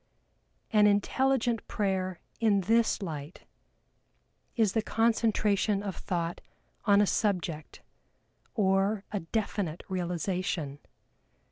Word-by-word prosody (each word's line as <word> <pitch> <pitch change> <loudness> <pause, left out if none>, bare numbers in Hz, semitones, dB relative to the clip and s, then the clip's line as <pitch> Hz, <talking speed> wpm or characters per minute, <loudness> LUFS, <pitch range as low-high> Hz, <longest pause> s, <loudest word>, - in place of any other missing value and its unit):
An 210 -1 +6
intelligent 240 +3 +1
prayer 190 -3 -1 0.2
in 210 -3 +3
this 225 +2 +2
light 155 -2 -6 1.1
is 220 -5 +2
the 220 - +2
concentration 215 -3 +1
of 195 -4 -4
thought 170 -2 -3 0.4
on 200 -2 +5
a - - +5
subject, 180 -8 -2 0.7
or 195 0 +2
a 205 - -1
definite 185 -2 -2
realization. 180 -4 -2
200 Hz, 95 wpm, -29 LUFS, 180-215 Hz, 1.1 s, An